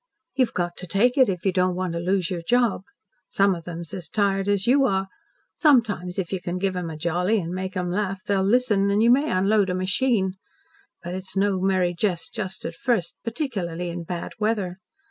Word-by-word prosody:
"You've 255 -3 +1
got 175 -1 -2
to 180 - -7
take 235 +8 +2
it, 260 -5 +5
if 185 -1 -3
you 190 - +3
don't 180 0 +1
want 185 -2 -2
to 170 - -2
lose 185 0 0
your 175 -2 -2
job. 240 +2 +2 0.5
Some 195 0 +3
of 170 -2 -7
them's 170 -2 -7
as 180 -4 -5
tired 195 -2 +1
as 200 -1 +1
you 275 +3 +4
are. 195 -2 0 0.5
Sometimes, 220 - +2
if 190 -1 -2
you 185 - -2
can 175 0 -3
give 190 0 -1
'em 180 -2 -3
a 160 - -6
jolly 175 +6 +1
and 170 -1 -4
make 185 +1 -4
'em 180 -1 -1
laugh, 195 0 -2
they'll 200 -1 +1
listen, 205 -1 +2
and 205 +2 +3
you 235 - +6
may 280 +5 +3
unload 195 +1 +2
a 180 - 0
machine. 190 +1 +1 0.7
But 175 0 -5
it's 190 +1 -6
no 195 -1 +2
merry 185 -2 +2
jest 175 -2 -2
just 190 -4 -5
at 165 - -3
first 190 -3 -1
particularly 195 - -3
in 175 0 -5
bad 170 0 -5
weather. 205 -4 -1
190 Hz, 210 wpm, -24 LUFS, 180-210 Hz, 0.7 s, you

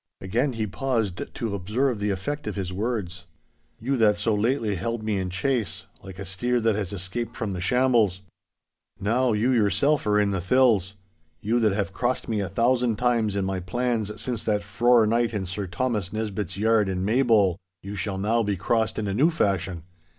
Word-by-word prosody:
Again 120 +9 0
he 110 -2 -2
pauses 115 -2 -1 0.2
to 115 -3 -3
observe 110 +6 -1
the 105 0 -1
effect 110 +9 -3
of 105 - -3
his 95 -2 -4
words. 95 -5 -3 0.5
'You 135 +4 -1
that 105 -3 +4
so 110 +2 +1
lately 110 0 +1
held 110 +5 -3
me 105 -2 0
in 95 -1 -2
chase, 105 +1 -1 0.2
like 95 -2 -10
a 100 - -6
steer 120 +7 0
that 115 -1 +2
has 100 -2 -3
escaped 100 +5 -4
from 105 -4 -2
the 90 - -4
shambles. 115 -4 +2 0.8
Now 115 +4 +1
you 110 +5 +2
yourself 130 +5 +2
are 105 0 +3
in 100 -1 +2
the 95 -2 -1
thills. 105 -3 +3 0.4
You 115 +6 +1
that 110 -3 +3
have 100 -1 -2
crossed 125 +4 -1
me 110 -2 -1
a 100 - -2
thousand 120 -1 +2
times 115 -3 +1
in 100 -1 0
my 95 -1 -2
plans 110 +2 -2
since 120 -4 -2
that 105 -1 +1
frore 115 +3 +4
night 115 0 +1
in 100 -2 -2
Sir 95 +2 -4
Thomas 105 0 -2
Nesbitt's 105 -4 -3
yard 110 -1 +3
in 95 0 -2
Maybole, 110 -6 +3 0.3
you 100 +2 -6
shall 95 -1 -3
now 110 +4 +1
be 105 -3 -1
crossed 110 +4 0
in 105 - -2
a 100 - -1
new 140 +11 +4
fashion. 95 - -1
105 Hz, 195 wpm, -25 LUFS, 95-120 Hz, 0.8 s, that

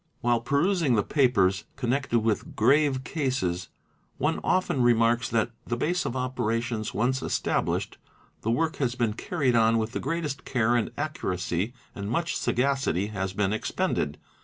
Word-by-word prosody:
While 120 -1 +2
perusing 145 +1 +2
the 105 - +2
papers 105 -9 +2
connected 125 -2 0
with 110 -1 -1
grave 135 +3 +3
cases 120 - -2 0.5
one - - 0
often 185 -8 +1
remarks 120 0 +3
that, 115 0 +1 0.2
the 120 - -1
base 175 +8 0
of 120 - -2
operations 120 -3 -1
once 125 +6 0
established, - - -1 0.4
the 110 - -2
work 160 +7 +1
has 125 -3 0
been 120 -4 0
carried 135 0 0
on 115 0 +4
with 110 0 -1
the - - -3
greatest 150 -2 -3
care 120 -2 +1
and 120 - +1
accuracy 100 - -2 0.2
and 100 0 -5
much 170 +8 -1
sagacity 125 - 0
has 95 -2 -3
been 100 0 0
expended. 110 - -1
120 Hz, 150 wpm, -27 LUFS, 110-140 Hz, 0.5 s, on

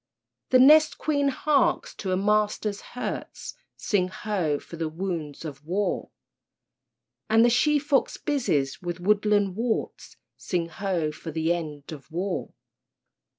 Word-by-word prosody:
The 255 - +6
nest 305 +4 +6
queen 285 -2 +1
harks 275 +1 +1
to 195 - -4
her 185 - +1
master's 210 0 0 0.2
hurts, - - -5 0.2
(Sing 190 -4 +1
ho! 185 -6 -1
for 170 - -11
the 165 -1 -2
wounds 165 -3 -5
of 140 -2 -8
war!) 190 +6 -1 1.2
And 225 +1 +5
the 240 - +4
she 300 +5 +3
fox 285 -1 +1
busies 195 - -1
with 175 -1 -4
woodland 205 0 +2
worts, 230 +1 -3 0.2
(Sing 170 -3 -2
ho! 170 -3 -2
for 160 - -9
the 160 +2 0
end 150 -4 -6
of 140 -3 -10
war!) 180 +3 -3
195 Hz, 135 wpm, -26 LUFS, 165-230 Hz, 1.2 s, The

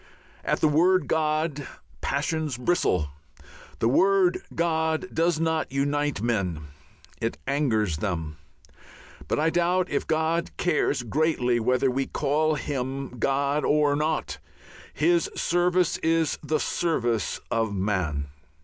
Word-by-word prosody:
At - - 0
the - - +5
word 180 +5 +3
"God" 155 -2 0 0.3
passions 150 -1 -1
bristle. 120 - +1 0.7
The 115 - +1
word 190 +7 +3
"God" 160 0 0
does 165 0 +1
not 160 -2 0
unite 145 -3 0
men, 95 -9 -1 0.6
it 115 - -2
angers 115 - +1
them. 80 -5 -3 0.9
But - - 0
I 160 +2 +2
doubt 175 +2 +1
if - - -1
God 160 +1 0
cares 150 -6 +1
greatly 125 -2 +1
whether 125 +3 +2
we 135 +1 -1
call 155 +2 +1
Him 135 -3 -4
God 140 +3 +1
or 145 -1 +3
no. 155 +2 0 0.7
His 170 +2 +2
service 175 0 +1
is 165 -1 +1
the 155 +1 -1
service 120 -10 -1
of 115 -2 0
man. 95 -8 -1
150 Hz, 120 wpm, -26 LUFS, 120-160 Hz, 0.9 s, the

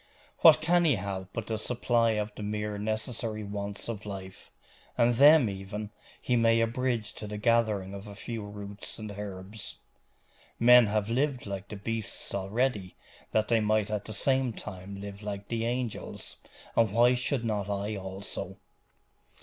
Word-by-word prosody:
'What 155 -2 +8
can 175 +2 +4
he 155 -6 +4
have 95 -1 -5
but 115 - -4
the 110 -1 -2
supply 115 -1 +2
of 105 0 -2
the - - -9
mere 105 0 -3
necessary 110 0 -2
wants 100 0 -5
of 110 -3 -4
life? 95 -2 -8 0.5
and 120 +1 +4
them, 145 +1 +7
even, 100 +2 -5 0.3
he 125 - 0
may 115 -1 +4
abridge 115 -1 0
to 105 - -7
the 105 0 -5
gathering 110 -4 +2
of 100 +1 -7
a 100 - -9
few 115 +1 -5
roots 100 0 -8
and 110 -1 -6
herbs. 100 +1 -7 0.8
Men 125 0 +8
have 105 +1 0
lived 135 +1 0
like 100 -1 -5
the - - -7
beasts 110 +2 -3
already, 100 0 -1 0.3
that 110 0 +1
they 115 -1 +3
might 110 0 +1
at 105 -1 -2
the 110 - -6
same 130 0 +2
time 95 0 -8
live 100 0 -8
like 100 -1 -5
the 115 -1 -1
angels 120 -1 -3 0.4
and 115 -3 +4
why 120 +3 +5
should 125 0 0
not 105 -3 -1
I 100 +1 -2
also? 95 0 -5
105 Hz, 165 wpm, -29 LUFS, 100-115 Hz, 0.8 s, What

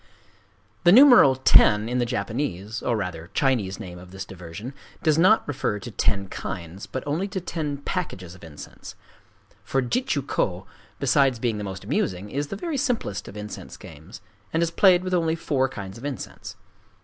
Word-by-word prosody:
The 175 - +7
numeral 245 - +8
"ten," 105 -4 +5
in 125 +1 -1
the 120 - +1
Japanese, 110 -4 -3
or 120 - 0
rather 90 -4 -5
Chinese 110 -9 +1
name 90 -1 -8
of 90 0 -13
this 95 +1 -7
diversion, 95 +7 -8 0.3
does 155 -1 +3
not 190 +6 +5
refer 125 -7 -1
to 120 +4 -8
ten 100 -1 0
kinds, 90 0 -6
but 130 - -5
only 155 +7 -1
to 195 -1 -4
ten 155 -5 -3
packages 135 - -4
of 90 - -16
incense; 75 -3 -11 0.7
for 135 - 0
Jitchū 250 - 0
kō, - - -1 0.3
besides 135 -5 +3
being 115 -2 -1
the - - -4
most 95 -1 -6
amusing, 95 +2 -2
is 145 +1 -2
the 195 - -5
very 315 - -3
simplest 225 - -2
of 105 - -9
incense 105 0 -8
games, 80 +5 -12 0.3
and 165 +1 +1
is 165 - -1
played 180 0 +5
with 185 0 -3
only 165 -2 +2
four 135 -5 0
kinds 100 -3 -8
of - - -13
incense. 125 -6 -6
120 Hz, 175 wpm, -25 LUFS, 95-160 Hz, 0.7 s, numeral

